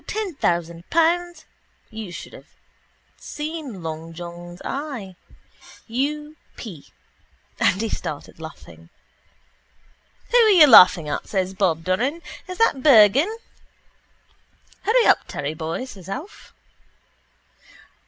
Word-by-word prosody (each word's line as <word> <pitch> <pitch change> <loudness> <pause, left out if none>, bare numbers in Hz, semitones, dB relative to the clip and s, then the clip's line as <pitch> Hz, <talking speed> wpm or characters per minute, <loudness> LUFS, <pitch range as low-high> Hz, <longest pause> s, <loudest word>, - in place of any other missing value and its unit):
Ten 425 -4 -3
thousand 170 - -2
pounds. 345 +2 +1 0.5
You 220 -4 -7
should - - -9
have - - -15 0.6
seen 295 - -7
long 160 +1 -6
John's 175 +1 -9
eye. 265 -10 -5 0.7
U. 295 +6 -3 0.2
p.... 180 - -10 0.7
And 185 - +2
he 225 - -1
started 150 -3 -6
laughing. 85 - -12 1.4
—Who - - +5
are 450 -2 +6
you 360 -7 +8
laughing 180 - +7
at? 150 - -4
says 190 -2 -2
Bob 180 -4 0
Doran. 255 - -1 0.2
Is 365 -1 -7
that 370 -12 +2
Bergan? 265 - +6 1.5
—Hurry 460 +4 +3
up, - - +3
Terry 145 +2 -4
boy, 160 +9 -4
says 195 -8 -12
Alf. 290 - -8
220 Hz, 110 wpm, -22 LUFS, -, 1.5 s, you